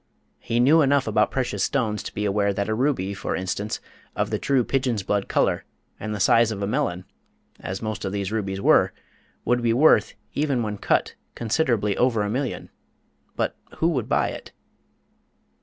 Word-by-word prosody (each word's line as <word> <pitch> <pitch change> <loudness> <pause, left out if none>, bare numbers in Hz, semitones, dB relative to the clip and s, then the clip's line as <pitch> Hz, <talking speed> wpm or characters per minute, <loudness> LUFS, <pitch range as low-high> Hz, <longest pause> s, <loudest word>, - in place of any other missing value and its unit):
He 115 0 -1
knew 150 +7 +6
enough 140 -2 +3
about 105 -1 +2
precious 130 -2 -1
stones 110 -6 0
to - - -7
be 105 - -1
aware 100 0 +1
that 100 0 -1
a 110 - 0
ruby, 115 -6 0
for 95 - -3
instance, 100 +3 -3 0.4
of - - -1
the - - -1
true 135 -3 +2
"pigeon's 125 -5 -1
blood" 100 0 -1
colour - - +1 0.4
and 110 - -4
the - - -5
size 115 +4 +4
of 100 -2 -4
a - - +1
melon, 100 -6 -1 0.5
as 95 +3 -5
most 110 -2 -3
of 95 - -2
these 100 -1 -3
rubies 100 -3 -2
were, - - +4 0.5
would 120 0 +2
be 115 -1 +2
worth, 125 -4 +4 0.2
even 140 -5 0
when 105 -2 -4
cut, - - +1 0.2
considerably 115 -4 0
over 120 -4 +2
a 105 - -2
million; 130 +2 -3 0.6
but - - -1 0.2
who 165 - +2
would 130 -9 -2
buy - - +2
it? - - -9
110 Hz, 180 wpm, -24 LUFS, 100-130 Hz, 0.6 s, knew